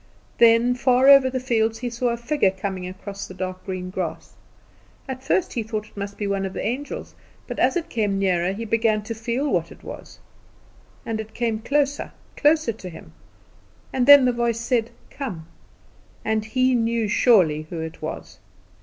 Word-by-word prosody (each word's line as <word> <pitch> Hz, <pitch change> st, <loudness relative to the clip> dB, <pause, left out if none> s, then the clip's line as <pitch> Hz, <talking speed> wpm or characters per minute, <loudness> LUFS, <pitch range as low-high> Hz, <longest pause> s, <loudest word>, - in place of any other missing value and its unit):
Then, 235 Hz, +1 st, +5 dB
far 255 Hz, +1 st, +4 dB
over 275 Hz, -2 st, +8 dB
the 260 Hz, 0 st, -2 dB
fields, 225 Hz, -3 st, 0 dB
he 245 Hz, +2 st, -4 dB
saw 240 Hz, +1 st, -1 dB
a 235 Hz, -, -1 dB
figure 235 Hz, -3 st, +1 dB
coming 190 Hz, -1 st, -4 dB
across 195 Hz, +2 st, -7 dB
the 185 Hz, -, -11 dB
dark 185 Hz, 0 st, -5 dB
green 185 Hz, -1 st, -4 dB
grass. 185 Hz, -3 st, -5 dB, 0.7 s
At 260 Hz, -1 st, -6 dB
first 350 Hz, +6 st, 0 dB
he 235 Hz, -, -1 dB
thought 215 Hz, -1 st, -5 dB
it -, -, -28 dB
must 200 Hz, 0 st, -6 dB
be 210 Hz, -, -3 dB
one 200 Hz, -1 st, -1 dB
of 190 Hz, -1 st, -4 dB
the -, -, -4 dB
angels; 260 Hz, +6 st, -4 dB, 0.3 s
but -, -, -6 dB
as -, -, +3 dB
it 335 Hz, -1 st, -3 dB
came 210 Hz, -9 st, -1 dB
nearer 185 Hz, -2 st, +1 dB
he 220 Hz, +4 st, -5 dB
began 220 Hz, -1 st, +1 dB
to 230 Hz, -, -4 dB
feel 235 Hz, +5 st, -2 dB
what -, -, 0 dB
it -, -, -15 dB
was. -, -, -10 dB, 0.9 s
And 225 Hz, -1 st, -3 dB
it 220 Hz, 0 st, -8 dB
came 230 Hz, -2 st, -1 dB
closer, 285 Hz, +4 st, 0 dB, 0.2 s
closer 300 Hz, -5 st, +3 dB
to 190 Hz, -4 st, -9 dB
him, 165 Hz, -, -12 dB, 0.8 s
and 255 Hz, -1 st, +1 dB
then 285 Hz, -2 st, +9 dB
the 250 Hz, -, +2 dB
voice 235 Hz, -1 st, 0 dB
said, 230 Hz, -1 st, 0 dB, 0.2 s
"Come," 205 Hz, -, -6 dB, 0.8 s
and 220 Hz, -1 st, 0 dB
he 255 Hz, +3 st, +2 dB
knew 230 Hz, -2 st, +1 dB
surely 180 Hz, -9 st, +3 dB
Who 170 Hz, -, -5 dB
it 160 Hz, 0 st, -6 dB
was. -, -, -7 dB
225 Hz, 185 wpm, -23 LUFS, 195-250 Hz, 0.9 s, then